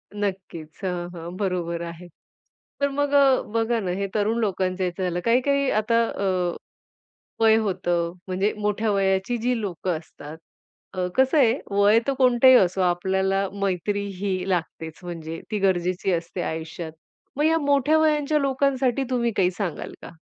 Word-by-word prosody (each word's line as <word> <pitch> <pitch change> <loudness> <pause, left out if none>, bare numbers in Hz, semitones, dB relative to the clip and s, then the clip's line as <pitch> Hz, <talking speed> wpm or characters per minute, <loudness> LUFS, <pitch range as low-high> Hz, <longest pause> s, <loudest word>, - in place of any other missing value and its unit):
नक्कीच. 185 -6 -5
हां, 175 -2 -3
हां, 170 +1 -8
बरोबर 175 -4 -2
आहे. 170 +1 -8 0.7
तर 280 - +3
मग 285 +1 -1 0.4
बघा 230 0 +1
ना, 185 -4 -2
हे 195 +2 -2
तरुण 215 +2 +1
लोकांच्या 185 -3 -1
ह्याचं 180 +1 -3
झालं. 175 -1 -1
काही-काही 270 +4 +2
आता 230 +2 +2
अ, 200 - -3 1.2
वय 220 0 +6
होतं, 175 -5 -1
म्हणजे 190 +3 0
मोठ्या 210 +1 0
वयाची 195 +3 +1
जी 240 +1 0
लोकं 180 -3 -2
असतात. 155 -1 -12 0.6
अ, 185 -1 -1
कसं 265 +3 +3
आहे 240 -5 +5 0.2
वय 205 +2 +5
तर 275 - +2
कोणतही 255 0 +6
असो 185 -1 +2
आपल्याला 190 +2 +1
मैत्री 200 +2 -1
ही 190 -1 -2
लागतेच 165 -3 -3
म्हणजे, 165 -2 -6
ती 210 - -1
गरजेची 185 -1 0
असते 170 +1 -3
आयुष्यात. 160 0 -5 0.5
मग 295 - +2
या 325 +1 +4
मोठ्या 285 +1 +3
वयाच्या 300 -1 +2
लोकांसाठी 270 -1 +1
तुम्ही 235 -2 +1
काही 185 -1 +3
सांगाल 180 -4 -4
का? - - -9
195 Hz, 150 wpm, -24 LUFS, 180-235 Hz, 1.2 s, वय